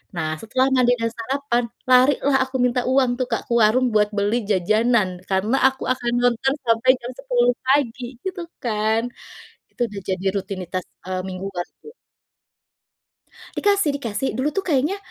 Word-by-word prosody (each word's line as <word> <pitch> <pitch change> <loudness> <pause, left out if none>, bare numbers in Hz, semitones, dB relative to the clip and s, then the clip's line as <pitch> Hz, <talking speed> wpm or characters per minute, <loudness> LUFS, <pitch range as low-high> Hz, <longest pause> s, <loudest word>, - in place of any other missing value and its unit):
Nah, 160 -2 -2
setelah 255 +4 +1
mandi 250 -1 +4
dan 230 - +1
sarapan, 245 +1 -1 0.3
lari 255 +3 +6
lah 280 -1 +3
aku 260 - -11
minta 250 0 +1
uang 260 -1 +3
tuh, 255 - +1
Kak, - - -1
ke - - -3
warung 225 +4 +4
buat 210 -1 +3
beli 205 +2 +1
jajanan 210 -1 +2
karena 200 +6 +1
aku 265 0 -9
akan 240 -2 -3
nonton 245 +2 +2
sampai 230 +2 +2
jam 240 +1 -6
10 245 -2 +2
pagi 260 -2 +1 0.2
gitu 375 -1 -4 0.2
kan. 220 -1 +1 0.7
Itu - - -9
udah 200 - -6
jadi 190 0 -2
rutinitas, 190 -2 -4 0.2
eee, 185 0 -3
mingguan 185 -1 -5 0.2
ku. 445 - -11 1.7
Dikasih 400 -6 +2
dikasih, 235 -1 -3
dulu 270 - +1
tuh 390 - 0
kayaknya, 300 +5 +1
240 Hz, 155 wpm, -22 LUFS, 205-265 Hz, 1.7 s, lari